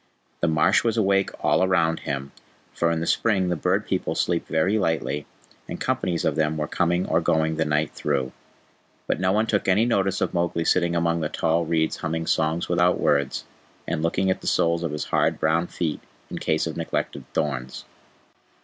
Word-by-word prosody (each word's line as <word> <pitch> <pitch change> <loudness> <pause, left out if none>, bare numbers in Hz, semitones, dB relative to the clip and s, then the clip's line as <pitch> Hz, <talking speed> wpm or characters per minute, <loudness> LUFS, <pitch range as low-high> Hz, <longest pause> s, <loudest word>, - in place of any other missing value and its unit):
The 85 - +1
marsh 80 -1 +3
was 115 -1 0
awake 100 -2 +2 0.2
all 95 - +3
round 85 -3 +2
him, 70 0 -4 0.4
for 85 - +1
in 85 -1 -1
the - - -1
spring 95 -1 +1
the 90 - +1
Bird 75 - 0
People - - -2
sleep 85 -1 0
very 95 +7 +1
lightly, 75 -5 -1 0.4
and - - -5
companies 85 -2 -1
of 75 - +1
them 80 0 0
were 75 - -1
coming 85 +1 0
or 80 +1 +1
going 80 -1 +1
the 80 - +1
night 75 0 0
through. 65 -3 -2 0.7
But - - -1
no 95 0 +2
one 105 +3 +2
took 105 -2 0
any 100 +4 +4
notice 95 -5 +1
of - - -1
Mowgli 85 -1 0
sitting 85 -1 +2
among 85 0 +1
the 75 - -1
tall 85 +1 0
reeds 80 -1 0
humming 80 0 -3
songs 80 +1 0
without 90 +1 +2
words, 70 -2 +1 0.4
and 80 - -1
looking 95 +3 +1
at - - -2
the - - -7
soles 85 0 +2
of 85 - -2
his 75 0 -3
hard - - +1
brown 80 +2 +1
feet 80 -4 -3 0.3
in - - -4
case - - 0
of - - -4
neglected - - -3
thorns. 65 -3 -3
85 Hz, 195 wpm, -24 LUFS, 80-90 Hz, 0.7 s, any